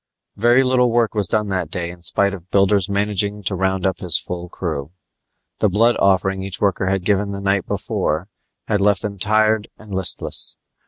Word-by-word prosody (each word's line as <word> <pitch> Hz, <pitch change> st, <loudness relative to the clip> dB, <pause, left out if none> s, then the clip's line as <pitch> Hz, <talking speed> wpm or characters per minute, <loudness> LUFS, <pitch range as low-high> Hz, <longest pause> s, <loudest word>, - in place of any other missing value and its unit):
Very 120 Hz, +5 st, +4 dB
little 125 Hz, -1 st, +3 dB
work 115 Hz, -1 st, +2 dB
was 105 Hz, -4 st, 0 dB
done 105 Hz, +4 st, +1 dB
that 90 Hz, -4 st, -2 dB
day 85 Hz, 0 st, -3 dB
in 90 Hz, 0 st, -14 dB
spite 100 Hz, +4 st, +2 dB
of 90 Hz, -2 st, -10 dB
Builder's 100 Hz, 0 st, +2 dB
managing 100 Hz, 0 st, -1 dB
to 95 Hz, -, -1 dB
round 95 Hz, 0 st, 0 dB
up 95 Hz, -, 0 dB
his 90 Hz, -2 st, +3 dB
full 90 Hz, 0 st, -5 dB
crew. 70 Hz, -3 st, -4 dB, 0.7 s
The 105 Hz, -, +3 dB
blood 115 Hz, +5 st, +3 dB
offering 95 Hz, 0 st, +2 dB
each 95 Hz, -1 st, -6 dB
worker 95 Hz, -2 st, +1 dB
had 95 Hz, -1 st, -1 dB
given 100 Hz, 0 st, +1 dB
the 100 Hz, -, -5 dB
night 100 Hz, -1 st, 0 dB
before 80 Hz, +5 st, -2 dB, 0.4 s
had 105 Hz, -2 st, +1 dB
left 100 Hz, 0 st, +3 dB
them 100 Hz, -2 st, -5 dB
tired 110 Hz, +1 st, +2 dB
and 105 Hz, -2 st, -11 dB
listless. 95 Hz, -1 st, -2 dB
100 Hz, 190 wpm, -20 LUFS, 95-105 Hz, 0.7 s, Very